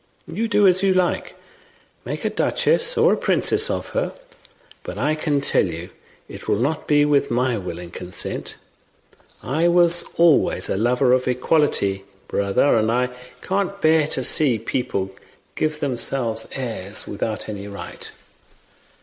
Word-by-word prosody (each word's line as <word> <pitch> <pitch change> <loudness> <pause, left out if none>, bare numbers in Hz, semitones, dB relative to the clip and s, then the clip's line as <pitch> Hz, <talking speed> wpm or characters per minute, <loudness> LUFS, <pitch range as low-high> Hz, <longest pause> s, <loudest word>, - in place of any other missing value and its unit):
You 230 +1 -3
do 205 -2 +3
as 185 0 +3
you 195 -1 +2
like, 180 -1 0 0.7
make - - -5
a - - 0
duchess - - +1
or 460 +2 +5
a - - 0
princess 430 +3 +2
of - - -3
her, - - -2 0.7
but - - -8
I 150 - +1
can 150 -2 -1
tell 140 - +2
you 85 +1 -7 0.4
it - - -11
will - - +2
not 145 +7 -2
be 145 -1 +4
with 145 -1 +2
my 125 +1 +1
will 90 -3 -6
and 90 0 -10
consent. 90 - -4 0.9
I 155 +7 +1
was 175 0 +4
always 170 -3 +3
a - - 0
lover 125 +4 +2
of 130 0 +1
equality, 125 -7 +1 0.2
brother, 100 +8 +2
and 110 0 +1
I 125 +1 +1 0.3
can't 200 +1 -2
bear 155 -3 +3
to - - -2
see 135 -7 +4
people 105 -4 -3 0.4
give 155 -1 -2
themselves 120 -4 -1
airs 110 -6 -4
without 110 +1 -4
any 100 -2 -6
right. 100 0 -8
135 Hz, 150 wpm, -21 LUFS, 110-170 Hz, 0.9 s, or